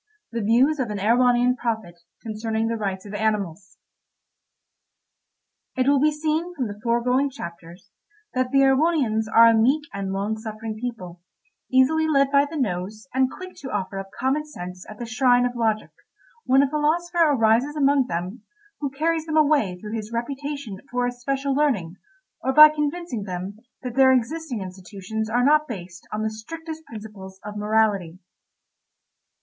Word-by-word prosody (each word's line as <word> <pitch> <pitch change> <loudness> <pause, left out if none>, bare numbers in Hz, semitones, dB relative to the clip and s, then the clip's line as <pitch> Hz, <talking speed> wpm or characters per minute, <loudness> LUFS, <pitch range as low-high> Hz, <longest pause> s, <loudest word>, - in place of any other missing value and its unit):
THE 230 -1 -2
VIEWS 250 +8 +3
OF 250 -4 -1
AN 210 -1 -3
EREWHONIAN 245 +3 +3
PROPHET 220 -8 -3 0.2
CONCERNING 220 0 -2
THE 230 - -1
RIGHTS 195 -3 -3
OF 205 - -9
ANIMALS 205 -3 -2 2.0
It 255 0 +1
will 280 0 +4
be 305 +2 +4
seen 315 +3 -2
from 265 -6 -2
the 205 -1 -7
foregoing 250 +4 +1
chapters 170 -7 -10 0.4
that 255 0 0
the 275 +1 +3
Erewhonians 270 -5 +2
are 230 - +8
a 230 - +6
meek 260 +7 +3
and 195 -1 -3
long 200 +3 -2
suffering 220 0 -6
people, 185 -8 -6 0.5
easily 275 +5 +4
led 275 -3 +3
by 280 0 +5
the 320 - -5
nose, 215 -1 -3
and 260 0 +2
quick 370 +5 -9
to 270 - -8
offer 195 -2 -3
up 195 0 -7
common 270 +4 +1
sense 180 -11 -9
at 215 - -10
the 240 - -5
shrine 245 +1 +3
of 245 0 -2
logic, 220 -2 0 0.5
when 270 +2 +5
a 280 - 0
philosopher 340 +3 +1
arises 235 +4 +2
among 280 -3 +3
them, 180 +6 -4 0.4
who 285 - -2
carries 320 +4 -1
them 315 0 0
away 285 -12 +3
through 210 +3 -7
his 220 -1 -5
reputation 270 -2 -4
for 245 0 0
especial 270 +3 -2
learning, 240 - 0 0.5
or 265 - +1
by 305 +3 +10
convincing 300 -4 -3
them 185 +2 -6 0.2
that 250 -2 -4
their 265 0 +6
existing 260 0 -1
institutions 195 +3 -6
are 245 +2 +2
not 305 +1 +4
based 180 -5 -8
on 215 0 -2
the 220 - -1
strictest 320 +8 -8
principles 205 -3 -10
of 210 0 -6
morality. 210 -5 +1
240 Hz, 160 wpm, -24 LUFS, 210-280 Hz, 2.0 s, by